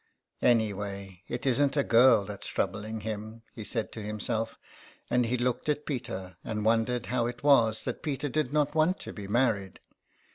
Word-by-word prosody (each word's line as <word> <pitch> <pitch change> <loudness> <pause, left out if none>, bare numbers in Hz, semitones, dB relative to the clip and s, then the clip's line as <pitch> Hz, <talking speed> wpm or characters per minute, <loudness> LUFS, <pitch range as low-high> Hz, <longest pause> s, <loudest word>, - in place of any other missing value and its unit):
'' - - -43
Any 110 -2 0
way 100 -2 -6
it 120 +2 -4
isn't 140 +2 +3
a 140 - +4
girl 115 -4 +6
that's 100 -1 -7
troubling 105 +3 -2
him," 110 +1 -6
he 110 - -7
said 115 +1 -2
to 110 - -7
himself, 110 +2 -2 0.5
and 125 -1 +3
he 125 +2 0
looked 125 +4 -1
at 150 0 0
Peter, 95 - -5
and 105 -1 -3
won 115 0 +3
dered 125 -1 -2
how 120 -2 0
it 120 +2 -6
was 115 -7 +4
that 125 - -4
Peter 145 -1 -2
did 145 -1 -1
not 150 -1 +1
want 160 +4 +2
to - - -7
be 100 -2 -7
married. 105 -4 +1
115 Hz, 190 wpm, -29 LUFS, 105-130 Hz, 0.5 s, girl